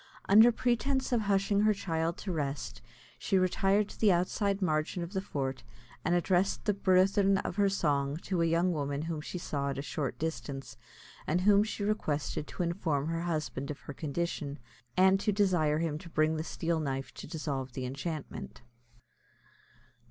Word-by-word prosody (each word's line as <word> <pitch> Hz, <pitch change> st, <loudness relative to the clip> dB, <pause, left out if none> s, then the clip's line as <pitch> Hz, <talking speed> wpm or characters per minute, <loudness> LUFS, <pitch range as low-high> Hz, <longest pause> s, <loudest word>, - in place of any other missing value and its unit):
Under 220 Hz, +4 st, +8 dB
pretence 250 Hz, +3 st, 0 dB
of 240 Hz, -2 st, +2 dB
hushing 200 Hz, 0 st, +2 dB
her 215 Hz, 0 st, +4 dB
child 165 Hz, -3 st, -1 dB
to 195 Hz, -, -4 dB
rest, 145 Hz, -4 st, -3 dB, 0.4 s
she 195 Hz, -, +1 dB
retired 195 Hz, +2 st, +2 dB
to -, -, -12 dB
the 215 Hz, -3 st, +5 dB
outside 195 Hz, +3 st, +1 dB
margin 160 Hz, -1 st, 0 dB
of 170 Hz, +4 st, -7 dB
the 190 Hz, -, 0 dB
fort, 135 Hz, -9 st, -3 dB, 0.4 s
and 175 Hz, -, +2 dB
addressed 180 Hz, +2 st, +1 dB
the 210 Hz, -, +3 dB
burthen 195 Hz, +1 st, +3 dB
of -, -, -4 dB
her 200 Hz, -1 st, +4 dB
song 145 Hz, -6 st, 0 dB
to 180 Hz, -3 st, -1 dB
a 165 Hz, -, +3 dB
young 170 Hz, +2 st, +2 dB
woman 145 Hz, -1 st, -2 dB
whom 160 Hz, -2 st, -3 dB
she 180 Hz, -, -6 dB
saw 140 Hz, -5 st, -2 dB
at 135 Hz, -, -3 dB
a 140 Hz, -, -3 dB
short 140 Hz, -3 st, -3 dB
distance, 135 Hz, -6 st, -4 dB, 0.5 s
and 175 Hz, +4 st, +1 dB
whom 205 Hz, +1 st, +5 dB
she 215 Hz, -1 st, -4 dB
requested 155 Hz, -8 st, -1 dB
to 180 Hz, -, -3 dB
inform 165 Hz, -4 st, -1 dB
her 165 Hz, 0 st, -1 dB
husband 155 Hz, -5 st, -3 dB
of 150 Hz, -, -6 dB
her 145 Hz, -, -8 dB
condition, 150 Hz, -1 st, -3 dB, 0.4 s
and 190 Hz, +1 st, +5 dB
to 210 Hz, -, +1 dB
desire 180 Hz, -7 st, +2 dB
him 155 Hz, -2 st, -1 dB
to 170 Hz, -, -11 dB
bring 155 Hz, 0 st, +2 dB
the 155 Hz, -, -2 dB
steel 165 Hz, 0 st, -1 dB
knife 135 Hz, -3 st, -3 dB
to -, -, -9 dB
dissolve 140 Hz, -6 st, -4 dB
the 130 Hz, 0 st, -4 dB
enchantment. 140 Hz, 0 st, -6 dB
170 Hz, 175 wpm, -31 LUFS, 150-195 Hz, 0.5 s, Under